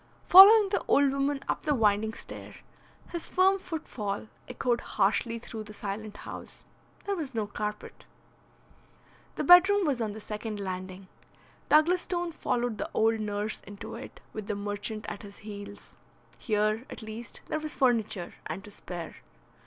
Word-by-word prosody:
Following 400 +2 +10
the 400 - 0
old 280 -1 +4
woman 275 0 0
up - - -1
the 295 -2 +1
winding 220 -1 +2
stair, - - -9 0.6
his 340 -2 -4
firm 385 +1 +3
footfall 225 - -5 0.2
echoed 245 -1 0
harshly 220 +3 0
through 225 -1 -7
the 210 0 -10
silent 210 +1 -5
house. - - -9 0.4
There 400 - -1
was 290 -8 -5
no 220 -2 0
carpet. 210 +1 -6 1.3
The - - -2
bedroom 380 +3 +7
was 270 -6 0
on 215 -2 -2
the 220 - -8
second 210 0 -5
landing. 185 0 -6 0.6
Douglas 340 +4 +5
Stone 350 -1 -2
followed 240 -7 -2
the - - -3
old 225 0 +3
nurse 210 0 -2
into 205 0 -9
it, - - -9
with 215 -2 -6
the 210 - -1
merchant 205 +2 -4
at 205 - -6
his 200 -1 -12
heels. 205 -1 -10 0.4
Here, 215 +1 0
at - - -8
least, 220 +1 -8
there 310 - -2
was 310 0 -5
furniture 220 -8 +1
and 165 +5 -5
to 210 - -11
spare. 175 -4 -7
220 Hz, 155 wpm, -29 LUFS, 205-285 Hz, 1.3 s, Following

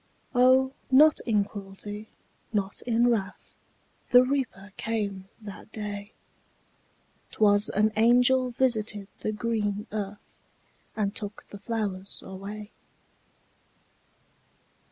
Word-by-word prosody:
O, 260 +1 +5 0.2
not 300 +4 +6
in 210 -3 +3
cruelty, 205 +1 -8 0.4
not 200 -3 -2
in 235 0 +3
wrath, 200 -4 -3 0.6
The 250 0 +8
Reaper 255 -7 -2
came 200 -4 -3
that 210 0 -10
day; 205 -1 -6 1.2
'Twas 205 0 +4
an 215 +2 +2
angel 250 +3 +4
visited 220 -5 0
the 215 - -2
green 210 -2 -1
earth, 205 -1 -6 0.6
And 205 -2 -1
took 205 0 -6
the 205 - -9
flowers 200 -3 -4
away. 205 +3 -8
210 Hz, 95 wpm, -27 LUFS, 200-235 Hz, 1.2 s, The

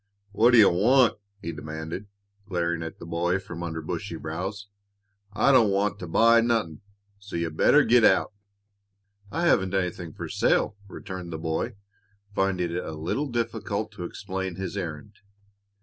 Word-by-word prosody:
"What 115 +4 +4
d' - - +8
you 105 -3 +8
want?" 120 +6 +4 0.2
he 85 - -3
demanded, 80 +5 -6 0.4
glaring 85 -2 -1
at 80 0 -6
the - - -10
boy 85 +2 0
from 90 -3 -8
under 80 -2 -4
bushy - - -4
brows. 95 +6 -5 0.7
"I 115 +6 +3
don't 120 -6 +5
want 100 +1 0
to 90 - -6
buy 115 +7 +5
nothin', 115 -9 0 0.4
so 100 -2 -9
you'd 85 -2 -2
better 150 - +5
git 120 -2 +4
out." 105 - +4 1.0
"I 170 +1 -1
haven't 95 - +3
anything 90 -3 -2
for - - -6
sale," - - +1
returned 95 -3 -7
the 80 - -4
boy, 80 +2 -2 0.6
finding 95 -3 0
it 90 +1 -2
a 80 - -6
little 85 - -2
difficult 110 -3 -2
to 105 -4 -8
explain 95 -1 -5
his 95 +1 -5
errand. 85 +1 -6
95 Hz, 160 wpm, -26 LUFS, 85-110 Hz, 1.0 s, d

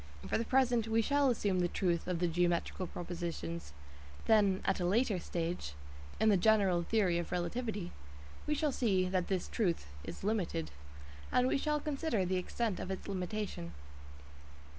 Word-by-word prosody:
For - - +1
the 230 - -1
present 245 -3 +3
we 225 0 +2
shall 285 +2 +3
assume 205 -6 +1
the 175 - +3
"truth" 175 -1 0
of 180 -2 0
the 175 +1 +1
geometrical 175 +2 0
propositions, 170 - -5 0.5
then 200 -4 +4
at 195 - +1
a - - -1
later 205 +2 +2
stage 170 - -3 0.5
(in 220 - +4
the 200 - +5
general 195 -3 +4
theory 180 -2 +2
of 175 - -5
relativity) 190 +2 -2 0.6
we 300 - +2
shall 295 0 +1
see 195 -8 +2
that 185 -1 0
this 185 -2 -1
"truth" 180 - 0 0.2
is - - -8
limited, 185 - -1 0.6
and 250 0 +4
we 270 - +2
shall 300 +1 +1
consider 285 - -1
the 185 +1 0
extent 210 +3 -1
of - - -5
its 190 - -4
limitation. 190 - -3
190 Hz, 160 wpm, -34 LUFS, 175-225 Hz, 0.6 s, the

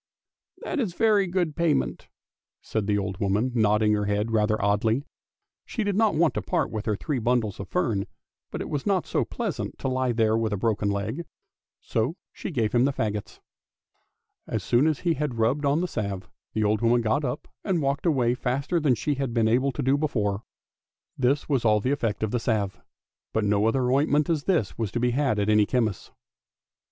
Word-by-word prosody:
That 320 - -2
is 200 -9 -1
very 210 -3 +3
good 175 -4 -1
payment," 170 -4 0 0.5
said 110 -3 -3
the 105 -1 +2
old 95 -2 -3
woman, 105 +6 +1
nodding 105 -2 +3
her 105 -1 0
head 105 +2 0
rather 110 -1 +2
oddly; 110 +6 +1 0.6
she 225 - -3
did 205 -2 0
not 215 -4 +3
want 165 0 +3
to - - -2
part 175 -3 -1
with 110 -1 -4
her 105 - +2
three 140 +5 -2
bundles 115 -3 0
of 100 - -6
fern, 115 - 0 0.4
but - - -5
it - - -4
was 145 +2 -2
not 190 -3 +2
so - - 0
pleasant - - -4
to 130 0 -1
he - - +2
there 110 -2 +2
with 110 -2 0
a - - -1
broken 105 0 0
leg, 105 +11 -2 0.6
so 115 +9 -1 0.2
she - - -6
gave 115 - 0
him 120 +1 +4
the 140 - +2
faggots. 105 -5 -3 1.1
As - - -2
soon 125 +6 +3
as 155 -3 0
he 170 -2 +2
had 145 -5 -3
rubbed 125 +6 +1
on 145 +4 +2
the 180 - 0
salve, 100 - -4 0.2
the 110 - 0
old 105 +1 +1
woman 120 +1 +3
got 115 +6 +1
up 135 +2 -3 0.2
and 185 -4 0
walked 140 +3 0
away 125 -7 +3
faster 135 +7 -1
than 145 -5 +3
she 145 +6 -1
had 135 -3 -3
been 115 -1 +3
able 130 +5 +2
to 135 +3 -4
do 135 +2 +2
before. 105 -9 0 0.7
This 135 +3 +1
was 135 -5 +1
all 105 -2 +4
the 125 +6 -1
effect 115 -7 -1
of 110 - -1
the 120 - 0
salve; 110 -4 -1 0.5
but 110 - +1
no 105 +1 +2
such - - -4
ointment 140 +4 +2
as 150 -3 -1
this 160 - 0
was 110 -4 -1
to 120 - 0
be 125 0 +2
had 135 -3 +1
at 105 0 0
any 105 -1 +4
chemist's. 110 -7 -1
120 Hz, 205 wpm, -26 LUFS, 105-145 Hz, 1.1 s, him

